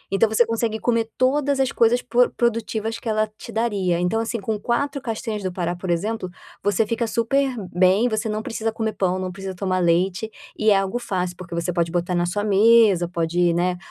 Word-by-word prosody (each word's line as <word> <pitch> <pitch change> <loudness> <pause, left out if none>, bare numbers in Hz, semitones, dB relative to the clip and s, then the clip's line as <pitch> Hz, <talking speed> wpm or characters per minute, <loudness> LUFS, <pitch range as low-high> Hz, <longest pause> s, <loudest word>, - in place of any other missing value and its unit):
Então, 220 +2 +3
você 220 +2 +3
consegue 225 -1 -1
comer 230 -1 0
todas 280 +2 +2
as 265 -1 +2
coisas 235 +1 +3
por 245 0 +2
produtivas 225 -1 -1
que 230 - -5
ela 215 0 +1
te - - -9
daria, 200 -6 0
então, 180 +6 0
assim, 230 +1 -3
com 210 +1 -3
4 270 +6 -1
castanhas 225 -3 -4
do 185 - -2
pará, 175 -1 -2
por 180 +1 -7
exemplo, 185 +3 -2 0.3
você 205 +2 +2
fica 230 +1 -1
super 245 +5 +1 0.2
bem, 185 +6 +4
você 220 0 -2
não 215 +1 -3
precisa 225 0 -2
comer 220 0 -2
pão, 185 -1 0
não 185 -1 -3
precisa 190 0 -7
tomar 185 0 -1
leite, 180 +4 +1 0.3
e 215 - +2
é 200 - +5
algo 195 +5 -1
fácil, 185 -6 -3
porque 175 -2 -8
você 170 +1 -2
pode 170 -1 0
botar 175 +1 -1
na 175 0 +1
sua 205 +4 -2
mesa, 210 -3 +5
pode, 170 0 +1
né, 180 +1 +1
215 Hz, 205 wpm, -22 LUFS, 180-230 Hz, 0.3 s, é